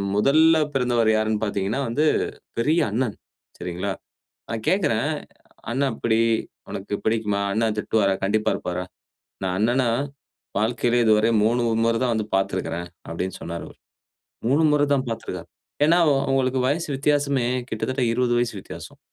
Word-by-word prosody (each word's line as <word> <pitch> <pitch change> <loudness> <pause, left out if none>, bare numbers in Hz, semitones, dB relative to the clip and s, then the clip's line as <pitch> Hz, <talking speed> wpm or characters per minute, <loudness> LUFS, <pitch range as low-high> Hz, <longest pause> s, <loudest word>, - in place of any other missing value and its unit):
முதல்ல 155 +9 +5 0.2
பிறந்தவர் 120 -4 +2
யார்னு 110 0 +1
பார்த்தீங்கனா, 100 +5 -1
வந்து 145 +7 +1 0.5
பெரிய 155 +8 +3
அண்ணன். 120 -2 -1 0.4
சரிங்களா? 90 +3 -3 0.6
நா 115 - -2
கேட்கறே, 150 - +2 0.7
அண்ண 130 +4 -1
எப்புடி? 110 -1 +1 0.5
உனக்கு 100 +1 -6
பிடிக்குமா? 110 -2 +1
அண்ண 115 +2 +1
திட்டுவாரா? 105 -2 +2
கண்டிப்பா 105 +2 +1
இருப்பாரா? 90 0 -3 0.6
நா 95 - 0
அண்ணன 120 +5 +2 0.8
வாழ்க்கையிலயே 120 +2 +2
இதுவர 110 +1 +4 0.2
3 120 +2 +2 0.2
மொற 115 - +3
தா - - +1
வந்து 110 -1 -1
பார்த்திருக்கிறேன் 85 -2 -2 0.2
அப்டினு 95 +3 -4
சொன்னாரு 85 0 -5
அவரு. - - -17 0.7
3 145 +5 +3
மொற 150 - +3
தா - - +4
பார்த்திருக்கிறார். 115 - -6 0.3
ஏனா 170 +3 +5
அவ 145 - +5
அவங்களுக்கு 130 -1 +1
வயசு 165 +4 -1
வித்தியாசமே 140 -2 +1 0.2
கிட்டத்தட்ட 130 0 -2
20 120 0 +1
வயசு 120 -2 0
வித்தியாசம். - - -10
115 Hz, 135 wpm, -23 LUFS, 105-135 Hz, 0.8 s, முதல்ல